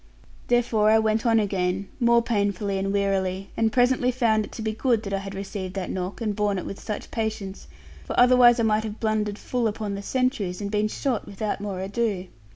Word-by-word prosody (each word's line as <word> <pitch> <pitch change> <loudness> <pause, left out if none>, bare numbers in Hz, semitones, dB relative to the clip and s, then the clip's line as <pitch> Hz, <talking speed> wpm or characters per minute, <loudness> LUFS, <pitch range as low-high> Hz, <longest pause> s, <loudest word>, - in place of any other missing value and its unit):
Therefore 230 -3 +3
I 220 - +6
went 220 +2 +1
on 225 -1 +4
again, 195 -1 -1
more 235 -1 +4
painfully 200 -3 0
and 195 0 -1
wearily, 195 -1 -1
and 225 -1 +1
presently 250 +1 +3
found 230 -4 +2
it - - -14
to 225 - -6
be 220 - 0
good 230 -1 +1
that 200 - -4
I 195 - 0
had 195 0 -7
received 195 -1 -5
that 190 -2 -3
knock, 185 +4 -4
and 210 -3 -1
borne 205 -1 0
it 185 - -4
with 195 - -6
such 210 - -6
patience; 215 -4 -4 0.4
for - - -2
otherwise 245 -1 +6
I - - +2
might 215 0 +2
have 215 -1 -6
blundered 215 -2 0
full 245 0 -1
upon 215 -1 -3
the 200 - -4
sentries, 225 -6 -1
and 200 -1 -4
been 210 0 +1
shot 250 +2 -2
without 205 0 -3
more 195 -3 -4
ado. 195 -2 -2
210 Hz, 210 wpm, -25 LUFS, 195-230 Hz, 0.4 s, I